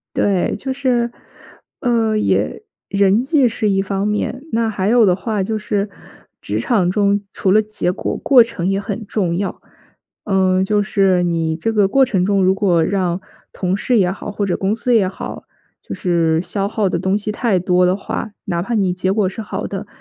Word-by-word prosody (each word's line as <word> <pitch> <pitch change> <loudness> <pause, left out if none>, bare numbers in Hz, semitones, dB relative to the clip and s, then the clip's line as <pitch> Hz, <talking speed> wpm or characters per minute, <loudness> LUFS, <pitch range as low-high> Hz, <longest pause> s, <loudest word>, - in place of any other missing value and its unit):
对， 195 -3 +1
就 265 +5 -4
是， 250 -3 0 0.7
呃， 230 -3 +1
也 215 - 0 0.3
人 200 +2 +3
际 275 -1 +3
是 215 -1 -1
一 195 -1 +2
方 195 +1 -2
面， 210 +5 -2
那 225 0 +1
还 200 -2 -1
有 235 0 +5
的 180 - +4
话 205 +2 -2
就 215 +3 -2
是 210 -1 -2 0.5
职 105 +2 -3
场 180 - +1
中 200 0 +2
除 190 - +1
了 215 - +6
结 210 -4 -2
果 - - -3
过 260 -4 +6
程 225 -6 -4
也 195 +1 +1
很 205 +1 -5
重 180 -6 -1
要。 195 +1 -3 0.6
呃， 190 -1 +2
就 205 +1 +1
是 195 -3 +2
你 165 -2 0
这 225 +7 -2
个 205 -3 +3
过 270 +6 +4
程 205 -8 0
中， 200 -1 +2
如 190 +1 +4
果 190 -4 +2
让 185 -2 -1 0.3
同 185 0 -1
事 240 +4 0
也 180 -3 +3
好， 205 +2 -6
或 205 0 -2
者 190 - 0
公 200 +2 0
司 245 +2 0
也 200 -5 +3
好， 190 - -7 0.4
就 - - -7
是 165 -3 +1
消 200 +1 -2
耗 215 -1 -1
的 170 - -1
东 190 +3 0
西 210 0 -2
太 210 -3 +1
多 180 0 +2
的 185 +2 +2
话， 215 +2 -5 0.2
哪 170 -3 -1
怕 230 +7 -3
你 195 -4 +1
结 185 +1 -1
果 210 -2 +1
是 195 - -7
好 210 - -4
的， 200 +1 -6
200 Hz, 215 characters per minute, -18 LUFS, 185-220 Hz, 0.7 s, 了